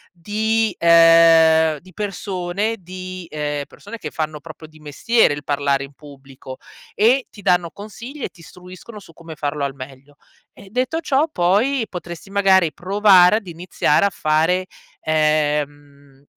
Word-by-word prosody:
di 215 Hz, +4 st, -1 dB
ehm, 165 Hz, -2 st, +5 dB
di 185 Hz, +5 st, -18 dB
persone 195 Hz, +1 st, -3 dB
di 185 Hz, 0 st, -9 dB
ehm, 145 Hz, -1 st, -3 dB
persone 230 Hz, +3 st, -11 dB
che 155 Hz, -7 st, -8 dB
fanno 155 Hz, -1 st, -4 dB
proprio 155 Hz, 0 st, -12 dB
di 155 Hz, 0 st, -20 dB
mestiere 155 Hz, +5 st, +1 dB
il 145 Hz, -, -7 dB
parlare 140 Hz, -1 st, -1 dB
in 140 Hz, -, -11 dB
pubblico, 135 Hz, -2 st, -13 dB, 0.4 s
e 245 Hz, +5 st, +2 dB
ti 205 Hz, -, -14 dB
danno 180 Hz, -3 st, +1 dB
consigli 235 Hz, +7 st, -10 dB
e -, -, -1 dB
ti 175 Hz, -, -20 dB
istruiscono 180 Hz, +6 st, -13 dB
su 190 Hz, -4 st, -17 dB
come 165 Hz, -1 st, -11 dB
farlo 145 Hz, -1 st, -4 dB
al 140 Hz, -1 st, -2 dB
meglio. 135 Hz, +1 st, -13 dB, 0.4 s
E 200 Hz, -, -16 dB
detto 255 Hz, +8 st, -2 dB
ciò, 295 Hz, -1 st, 0 dB
poi 220 Hz, -, +1 dB
potresti 175 Hz, 0 st, -9 dB
magari 190 Hz, -4 st, +3 dB
provare 195 Hz, 0 st, +4 dB
ad 205 Hz, -5 st, -8 dB
iniziare 170 Hz, -1 st, 0 dB
a 200 Hz, -, 0 dB
fare, 165 Hz, +5 st, 0 dB, 0.4 s
ehm, 145 Hz, -2 st, -2 dB
170 Hz, 145 wpm, -20 LUFS, 150-200 Hz, 0.4 s, ehm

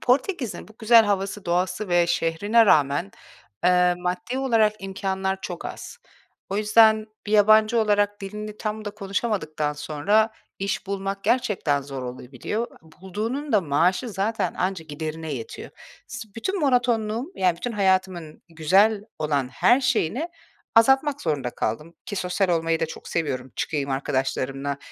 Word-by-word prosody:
Portekiz'in 255 Hz, -, 0 dB
bu -, -, -15 dB
güzel 225 Hz, 0 st, +6 dB
havası, 200 Hz, 0 st, -2 dB
doğası 180 Hz, +3 st, -1 dB
ve 175 Hz, -1 st, +3 dB
şehrine 205 Hz, +8 st, +2 dB
rağmen, 140 Hz, -, +3 dB, 0.5 s
eee, 180 Hz, 0 st, +4 dB
maddi 180 Hz, +7 st, -3 dB
olarak 225 Hz, -5 st, +3 dB
imkânlar 190 Hz, 0 st, -2 dB
çok -, -, -6 dB
az. 480 Hz, -, -7 dB, 0.5 s
O 195 Hz, -, -1 dB
yüzden, 215 Hz, 0 st, +5 dB, 0.2 s
bir 210 Hz, -, -3 dB
yabancı 215 Hz, +2 st, +5 dB
olarak 205 Hz, -1 st, +1 dB
dilini 210 Hz, +2 st, -6 dB
tam 215 Hz, 0 st, -4 dB
da 205 Hz, -, -3 dB
konuşamadıktan 195 Hz, -7 st, -2 dB
sonra 160 Hz, +10 st, +1 dB, 0.3 s
iş 195 Hz, 0 st, -2 dB
bulmak 195 Hz, 0 st, -4 dB
gerçekten 190 Hz, -, +1 dB
zor 135 Hz, -1 st, -6 dB
olabiliyor. 130 Hz, -, -4 dB, 0.3 s
Bulduğunun 225 Hz, +10 st, -4 dB
da 210 Hz, -, +5 dB
maaşı 180 Hz, -, +1 dB
zaten 210 Hz, +3 st, -1 dB
anca 185 Hz, -2 st, -2 dB
giderine 155 Hz, +1 st, -5 dB
yetiyor. 115 Hz, -3 st, -7 dB, 0.4 s
S 255 Hz, -3 st, -8 dB
bütün 380 Hz, -, -2 dB
monotonluğum, 245 Hz, -, +1 dB
yani, 180 Hz, -2 st, +2 dB
bütün 245 Hz, +6 st, -4 dB
hayatımın 185 Hz, -5 st, 0 dB
güzel 195 Hz, +7 st, +3 dB, 0.2 s
olan 145 Hz, -4 st, 0 dB
her 245 Hz, -, +3 dB
şeyini 255 Hz, -, 0 dB, 0.5 s
azaltmak 270 Hz, +5 st, +4 dB
zorunda 145 Hz, -6 st, -1 dB
kaldım. 150 Hz, +10 st, -3 dB
Ki 205 Hz, -, -5 dB
sosyal 185 Hz, +1 st, 0 dB
olmayı 165 Hz, -1 st, +1 dB
da -, -, +1 dB
çok -, -, -10 dB
seviyorum, 130 Hz, -6 st, -2 dB
çıkayım 140 Hz, -3 st, -2 dB
arkadaşlarımla. 135 Hz, +1 st, -2 dB
195 Hz, 135 wpm, -24 LUFS, 160-220 Hz, 0.5 s, güzel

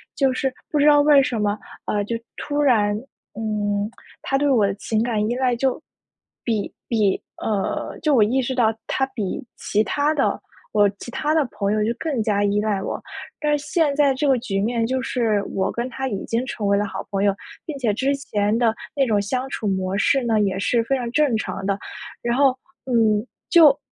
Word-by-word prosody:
就 270 Hz, -2 st, +2 dB
是 265 Hz, +1 st, 0 dB, 0.2 s
不 300 Hz, -, 0 dB
知 290 Hz, -, +5 dB
道 290 Hz, -1 st, +7 dB
为 290 Hz, -1 st, +6 dB
什 235 Hz, -4 st, -2 dB
么， 205 Hz, 0 st, 0 dB, 0.3 s
呃， 205 Hz, -, 0 dB
就 230 Hz, -, -2 dB, 0.2 s
突 290 Hz, 0 st, -2 dB
然， 215 Hz, -7 st, +3 dB, 0.4 s
嗯， 210 Hz, -1 st, -1 dB, 0.3 s
他 270 Hz, -, 0 dB
对 290 Hz, +1 st, +2 dB
我 235 Hz, -7 st, +4 dB
的 195 Hz, -, -1 dB
情 215 Hz, +2 st, -1 dB
感 220 Hz, -3 st, 0 dB
依 240 Hz, -, 0 dB
赖 255 Hz, -1 st, +1 dB
就 265 Hz, +3 st, 0 dB, 0.6 s
比 220 Hz, -4 st, -1 dB
比， 210 Hz, -5 st, +1 dB, 0.2 s
呃 205 Hz, -3 st, -2 dB
就 300 Hz, -3 st, +3 dB
我 225 Hz, -, +6 dB
意 250 Hz, +6 st, +2 dB
识 260 Hz, +1 st, -2 dB
到 225 Hz, -3 st, +3 dB
他 265 Hz, -, +1 dB
比 220 Hz, -5 st, -4 dB
其 210 Hz, +1 st, +1 dB
他 290 Hz, +6 st, +1 dB
的 285 Hz, -3 st, +1 dB, 0.3 s
我 205 Hz, -1 st, +5 dB
其 240 Hz, -, -8 dB
他 300 Hz, +5 st, 0 dB
的 315 Hz, -1 st, +3 dB
朋 205 Hz, 0 st, -1 dB
友 215 Hz, 0 st, +1 dB
就 220 Hz, -, +1 dB
更 290 Hz, -8 st, -1 dB
加 205 Hz, -1 st, +1 dB
依 205 Hz, +1 st, +1 dB
赖 210 Hz, -2 st, 0 dB
我。 -, -, -4 dB, 0.4 s
但 295 Hz, -1 st, +2 dB
是 290 Hz, -, -9 dB
现 320 Hz, -6 st, +2 dB
在 285 Hz, -2 st, +4 dB
这 265 Hz, +3 st, -1 dB
个 265 Hz, -2 st, +4 dB
局 195 Hz, -5 st, -2 dB
面 230 Hz, +2 st, 0 dB
就 260 Hz, +1 st, -1 dB
是， 230 Hz, -5 st, 0 dB
我 190 Hz, 0 st, +1 dB
跟 240 Hz, +2 st, -3 dB
他 265 Hz, +1 st, -3 dB
已 200 Hz, -7 st, -3 dB
经 235 Hz, +2 st, -1 dB
成 220 Hz, -5 st, -3 dB
为 200 Hz, 0 st, +3 dB
了 205 Hz, -, +1 dB
好 200 Hz, -, -5 dB
朋 195 Hz, 0 st, 0 dB
友， 200 Hz, -1 st, +3 dB, 0.3 s
并 305 Hz, -3 st, -5 dB
且 230 Hz, -5 st, +1 dB
之 270 Hz, +6 st, +1 dB
前 210 Hz, -5 st, 0 dB
的 230 Hz, -2 st, +3 dB, 0.2 s
那 275 Hz, -2 st, +3 dB
种 210 Hz, -3 st, +2 dB
相 255 Hz, +6 st, -2 dB
处 220 Hz, -, -3 dB
模 190 Hz, 0 st, -1 dB
式 265 Hz, +6 st, +3 dB
呢， 225 Hz, -2 st, +2 dB
也 195 Hz, -2 st, 0 dB
是 230 Hz, +4 st, +2 dB
非 270 Hz, +4 st, 0 dB
常 245 Hz, -2 st, -3 dB
正 290 Hz, -2 st, +2 dB
常 195 Hz, -2 st, -4 dB
的。 200 Hz, 0 st, 0 dB, 0.4 s
然 235 Hz, +1 st, 0 dB
后， 270 Hz, -2 st, +4 dB, 0.3 s
嗯， 225 Hz, -4 st, +2 dB, 0.2 s
就 310 Hz, -6 st, +7 dB
235 Hz, 230 characters per minute, -22 LUFS, 210-270 Hz, 0.6 s, 道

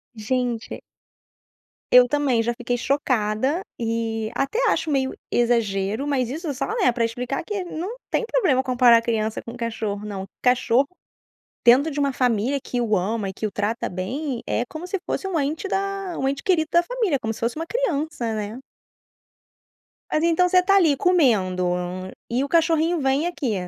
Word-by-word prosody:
Gente. 240 Hz, +1 st, -2 dB, 1.1 s
Eu 250 Hz, 0 st, +8 dB
também 270 Hz, -5 st, +1 dB
já 240 Hz, +1 st, 0 dB
fiquei 245 Hz, 0 st, -2 dB
chocada 260 Hz, -, 0 dB, 0.2 s
e 225 Hz, -1 st, -2 dB
até 275 Hz, -, -1 dB
acho 315 Hz, -, 0 dB
meio 265 Hz, -1 st, +1 dB, 0.2 s
exagero, 225 Hz, -1 st, +1 dB
mas 255 Hz, -4 st, 0 dB
isso 310 Hz, +1 st, -4 dB
só 275 Hz, -, -3 dB
né, 385 Hz, -, +3 dB
pra 235 Hz, -1 st, -1 dB
explicar 245 Hz, +5 st, -2 dB
que 400 Hz, -1 st, -3 dB
não 355 Hz, +6 st, -5 dB, 0.2 s
tem -, -, +1 dB
problema 315 Hz, -, +3 dB
comparar 245 Hz, -3 st, +5 dB
criança 220 Hz, -2 st, -1 dB
com 230 Hz, -, -9 dB
cachorro, 220 Hz, -3 st, -3 dB
não. 195 Hz, -2 st, -5 dB, 0.2 s
Cachorro 250 Hz, +1 st, +3 dB, 0.8 s
dentro 260 Hz, +6 st, +6 dB
de 290 Hz, -, -3 dB
uma 280 Hz, -1 st, +1 dB
família 250 Hz, +2 st, +1 dB
que 245 Hz, -, -3 dB
o 215 Hz, -3 st, +1 dB
ama 205 Hz, +3 st, -1 dB
e 190 Hz, -, -4 dB
que 215 Hz, -, -3 dB
o -, -, -3 dB
trata 215 Hz, +3 st, -1 dB
bem, 240 Hz, -, -3 dB
é 240 Hz, -, 0 dB
como 320 Hz, +3 st, -7 dB
se 390 Hz, -, -1 dB
fosse 385 Hz, -, -2 dB
um 345 Hz, -4 st, 0 dB
ente 305 Hz, +7 st, -2 dB
da 390 Hz, -2 st, -2 dB
um 270 Hz, -, 0 dB
ente 275 Hz, +1 st, -3 dB
querido 320 Hz, -5 st, +2 dB
da 345 Hz, 0 st, +5 dB
família, 420 Hz, -, 0 dB
como 220 Hz, 0 st, -2 dB
se -, -, -10 dB
fosse 230 Hz, +1 st, -1 dB
uma 325 Hz, +1 st, -4 dB
criança, 310 Hz, -, -1 dB
né? 215 Hz, +2 st, -4 dB, 1.5 s
Mas 310 Hz, -, +1 dB
então 340 Hz, +2 st, +3 dB
você 365 Hz, 0 st, +4 dB
tá 390 Hz, +1 st, +4 dB
ali 325 Hz, -8 st, +4 dB
comendo 220 Hz, -, +2 dB, 0.7 s
e 255 Hz, +3 st, +1 dB
o -, -, -2 dB
cachorrinho 330 Hz, 0 st, +2 dB
vem 275 Hz, +4 st, +1 dB
aqui, 285 Hz, -10 st, -2 dB
255 Hz, 170 wpm, -23 LUFS, 230-320 Hz, 1.5 s, Eu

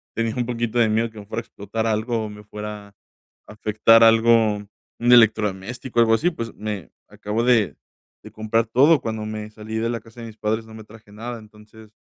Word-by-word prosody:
tenía 115 Hz, -1 st, -1 dB
un 120 Hz, -1 st, -1 dB
poquito 120 Hz, -1 st, -2 dB
de 115 Hz, -, +4 dB
miedo 110 Hz, +2 st, +1 dB
que 110 Hz, -, -12 dB
me 100 Hz, -, -10 dB
fuera 110 Hz, +2 st, -4 dB
a -, -, -20 dB
explotar 110 Hz, +3 st, -4 dB
algo 110 Hz, +1 st, -1 dB
o -, -, -6 dB
me 105 Hz, 0 st, -11 dB
fuera 105 Hz, 0 st, -7 dB
a -, -, -27 dB, 0.5 s
afectar 110 Hz, +2 st, +4 dB
algo, 115 Hz, -1 st, +5 dB, 0.4 s
un 120 Hz, +1 st, +2 dB
electrodoméstico, 115 Hz, +1 st, +2 dB
algo 115 Hz, -1 st, +5 dB
así, 165 Hz, +10 st, +2 dB
pues, 115 Hz, -7 st, -6 dB
me 105 Hz, -4 st, -6 dB, 0.2 s
acabo 105 Hz, +3 st, -3 dB
de 120 Hz, -5 st, +2 dB, 0.5 s
de -, -, -12 dB
comprar 110 Hz, +1 st, 0 dB
todo 140 Hz, +7 st, +4 dB
cuando 110 Hz, -1 st, -4 dB
me 110 Hz, 0 st, -6 dB
salí 110 Hz, 0 st, -8 dB
de 115 Hz, +1 st, -1 dB
la 115 Hz, -1 st, -2 dB
casa 115 Hz, +1 st, -14 dB
de 115 Hz, -, -7 dB
mis 110 Hz, -, -12 dB
padres, 110 Hz, +1 st, -2 dB
no 110 Hz, -, -14 dB
me 110 Hz, -1 st, -11 dB
traje 110 Hz, -1 st, -17 dB
nada, 115 Hz, +3 st, -7 dB
entonces, 110 Hz, 0 st, -17 dB
110 Hz, 210 wpm, -22 LUFS, 105-115 Hz, 0.5 s, algo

